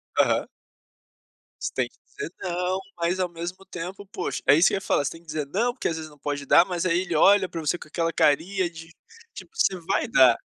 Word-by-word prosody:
Aham. - - +2 1.1
Você - - -3
tem - - 0
que - - -30 0.2
dizer 415 0 -5
não, 180 +1 -1 0.2
mas 175 +2 -1
ao 180 - +1
mesmo 175 +3 -7
tempo, 190 +3 -7
poxa, 190 -3 -4
é 140 - +8
isso 165 - +5
que - - +1
ia 195 - -2
falar, 145 - +1
tem 165 +3 -5
que - - -26
dizer 150 -2 -3
não 230 - 0
porque 260 - -3
às 165 - -1
vezes 160 -1 -6
não 150 - -18
pode 145 0 -3
dar, 170 - +7
mas 180 -1 -2
aí 175 0 +2
ele 175 -3 -3
olha 195 +3 +5
pra 165 - -5
você 160 +3 0
com - - -11
aquela 165 +1 -1
carinha 175 +6 +2
de 165 -1 -11 0.4
tipo: - - -11
você 195 - +2
vai 195 - +1
dar! 130 - +6
175 Hz, 230 wpm, -25 LUFS, 160-190 Hz, 1.1 s, é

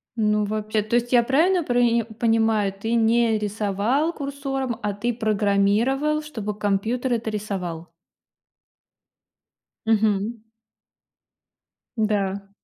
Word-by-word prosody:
Ну, 210 -2 +2
вообще, 215 0 -1
то 215 +3 -2
есть 240 +1 0
я 240 -1 +6
правильно 330 +8 +2
прои 240 -3 +2 0.2
понимаю, 225 -3 +2
ты 220 +4 -4
не 230 0 +3
рисовал 210 - 0
курсором, 275 -3 -3
а 205 -1 -1
ты 235 +4 -2
программировал, 220 +7 +1
чтобы 220 -9 -5
компьютер 220 +5 0
это 225 -1 -2
рисовал? 185 -6 -4 2.0
Мгм. 215 0 +1 1.5
Да. 200 -2 -1
220 Hz, 100 wpm, -23 LUFS, 205-245 Hz, 2.0 s, я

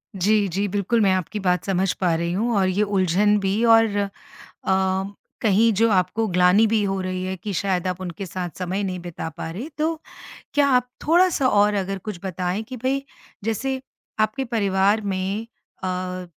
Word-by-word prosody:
जी, 205 +2 +2
जी, 195 +3 -1
बिल्कुल, 205 +4 0
मैं 195 -2 +4
आपकी 185 +3 -2
बात 180 -3 +1
समझ 190 -1 +1
पा 175 -3 +3
रही 170 +1 -1
हूँ 225 +4 0
और 190 -1 +3
ये 200 +3 +1
उलझन 200 +1 +2
भी। 200 +4 0
और 225 -2 +5
अ, 200 -1 0 1.3
कहीं 225 +2 +4
जो 230 - +5
आपको 195 +4 +1
ग्लानि 180 +5 +5
भी 220 -1 +2
हो 195 -1 -1
रही 185 0 -3
है 190 0 -3
कि 200 +3 -5
शायद 185 -1 0
आप 180 0 -3
उनके 185 +1 -5
साथ 180 0 -4
समय 185 +2 -2
नहीं 185 -2 -3
बिता 175 -2 -6
पा - - -5
रहें, 225 - -6
तो 315 +1 0 0.5
क्या 285 -1 +4
आप 250 -2 +3 0.2
थोड़ा-सा 340 -5 +4
और 210 -3 +4
अगर 195 0 -2
कुछ 205 -5 -4
बताएँ 185 +3 -2
कि 255 +3 -8
भई, 265 +3 0 0.4
जैसे 260 +4 -2 0.4
आपके 215 +5 +1
परिवार 205 -2 +2
में 195 +2 -2 0.4
अ, 185 0 -3
200 Hz, 180 wpm, -23 LUFS, 185-225 Hz, 1.3 s, और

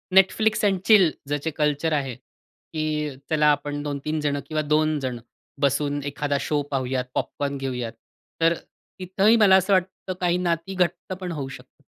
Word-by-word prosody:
Netflix 215 +3 +4
end 195 -2 +2
chill 195 -7 +6 0.2
ज्याचे 145 +2 -2
culture 150 +1 0
आहे, 135 -4 -1 0.6
की 155 -1 -1 0.2
चला 150 -1 +3
आपण 145 0 -2
2-3 150 +2 -3
जण 145 -1 0
किंवा 155 -1 -1
2 155 0 +1
जण 125 -3 -3 0.4
बसून 145 +1 +1
एखादा 145 0 -1
शो 150 -1 0
पाहूयात, 130 -1 -1
पॉपकॉर्न 140 -1 -2
घेऊयात. 125 -4 -3 0.5
तर 165 +1 +5
अ, - - -7 0.4
तिथंही 195 +5 +3
मला 200 -3 +6
असं 190 +1 +3
वाटतं 185 0 -1
काही 175 0 +2
नाती 175 +1 -1
घट्ट 180 +1 -1
पण 180 -2 -4
होऊ 140 -4 -4
शकतात. - - -13
155 Hz, 160 wpm, -24 LUFS, 145-180 Hz, 0.6 s, chill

